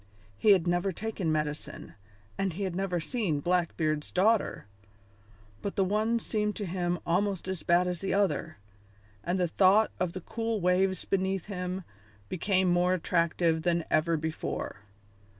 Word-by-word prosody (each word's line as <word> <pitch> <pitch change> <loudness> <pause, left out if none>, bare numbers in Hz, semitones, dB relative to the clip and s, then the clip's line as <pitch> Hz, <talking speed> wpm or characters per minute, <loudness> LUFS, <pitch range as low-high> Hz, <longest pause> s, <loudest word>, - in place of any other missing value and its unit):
He 210 - +2
had 185 -4 +2
never 175 +2 +1
taken 195 -3 -2
medicine 150 -1 -3 0.4
and 195 -3 -1
he 200 +5 -4
had 185 -3 -2
never 185 -2 -1
seen 180 - -1
Blackbeard's 160 -2 0
daughter, 210 - +2 1.0
but 200 - -4
the 195 - +3
one 215 +4 +1
seemed 210 -2 -1
to 205 - -3
him 175 -1 -1
almost 190 +2 0
as 185 -3 -3
bad 175 +1 +3
as 180 -2 -3
the 195 - -2
other, 195 -5 0 0.7
and 180 +2 -1
the 180 - +2
thought 195 +5 +4
of 180 -2 -1
the 185 - -5
cool 225 +3 -2
waves 185 0 +2
beneath 190 -1 0
him 185 -2 -4 0.5
became 185 +1 +1
more 180 +1 +3
attractive 170 -1 +1
than 170 0 +1
ever 165 +1 +2
before. 155 -6 -4
180 Hz, 150 wpm, -29 LUFS, 170-195 Hz, 1.0 s, thought